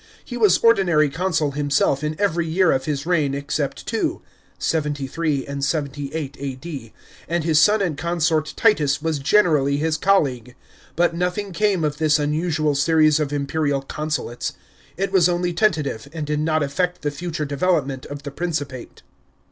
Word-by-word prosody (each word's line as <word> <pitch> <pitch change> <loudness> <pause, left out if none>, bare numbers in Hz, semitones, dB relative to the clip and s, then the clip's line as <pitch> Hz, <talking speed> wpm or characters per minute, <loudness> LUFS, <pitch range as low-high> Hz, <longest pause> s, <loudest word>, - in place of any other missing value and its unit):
He 245 - -7
was 210 -6 +4
ordinary 175 -10 +3
consul 165 -2 0
himself 145 0 +1
in 155 +1 -3
every 170 -5 +1
year 180 +2 +3
of 130 - 0
his 145 -1 -2
reign 155 -6 +1
except 140 0 -3
two - - -2 0.3
(73 145 -1 -1
and 140 0 -5
78 145 0 -3
A.D.), 135 -3 -6 0.4
and 170 -1 -1
his 155 -1 +3
son 210 +3 +4
and 170 -6 -1
consort 165 -1 0
Titus 150 -11 +3
was 160 -3 -1
generally 140 -4 +3
his 155 +1 0
colleague. 130 - +1 0.4
But 170 0 +2
nothing 180 +4 -2
came 195 -1 +1
of 150 -1 -1
this 155 -1 +3
unusual 155 0 0
series 155 +1 +3
of 150 -2 -1
imperial 145 -1 -1
consulates. 150 -4 -3 0.4
It 195 +1 -1
was 180 -3 +4
only 175 0 0
tentative, 155 - 0
and 155 -2 -4
did 150 0 -1
not 155 0 +1
affect 175 +6 -2
the 145 - 0
future 165 0 -4
development 140 -3 -1
of 145 0 -8
the 145 - -6
Principate. 145 -5 -5
155 Hz, 155 wpm, -22 LUFS, 140-175 Hz, 0.4 s, was